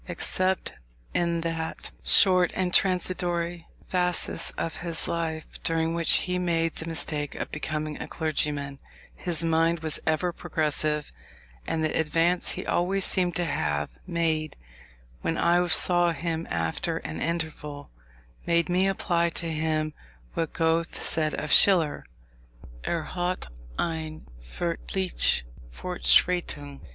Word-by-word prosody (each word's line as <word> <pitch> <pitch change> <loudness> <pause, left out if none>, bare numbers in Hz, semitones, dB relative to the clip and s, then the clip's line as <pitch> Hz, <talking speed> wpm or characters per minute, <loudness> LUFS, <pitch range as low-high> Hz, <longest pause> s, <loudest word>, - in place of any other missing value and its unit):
Except 185 +1 0 0.4
in 170 -1 +1
that 165 -1 -3
short 185 -2 +5
and 185 -1 -1
transitory 175 -2 +1 0.2
phasis 180 -1 +3
of 165 - -3
his 170 -2 -2
life, 160 -2 -4
during 165 0 +1
which 170 -1 +2
he 180 0 -1
made 165 -2 +1
the 160 - -5
mistake 150 -2 -3
of - - -5
becoming 155 0 -3
a - - -5
clergyman, 145 -3 -2 0.3
his 170 -2 -1
mind 165 0 +2
was 160 -2 -1
ever 165 +3 +1
progressive: 155 -3 -1 0.6
and 160 - -1
the 155 - 0
advance 165 +3 +2
he - - -5
always 190 +2 +1
seemed 180 -2 +1
to 175 - 0
have 75 - -1 0.2
made 160 -3 0 0.7
when 165 - -1
I 175 +1 +3
saw 175 -1 +3
him 165 0 -3
after 80 -1 -1
an 80 +1 -6
interval, 155 -3 -4 0.6
made 170 0 +2
me 185 +2 +3
apply 170 -3 +1
to 170 - -4
him 155 -1 -1 0.4
what 165 -2 -2
Goethe 165 +1 0
said 155 -1 +1
of 150 - -4
Schiller, 165 - +5 0.8
"er 170 -2 0
hatte 180 - -2 0.3
eine 160 -2 -3 0.2
furchtliche 170 - 0 0.3
Fortschreitung." 175 - +2
165 Hz, 125 wpm, -27 LUFS, 155-175 Hz, 0.8 s, short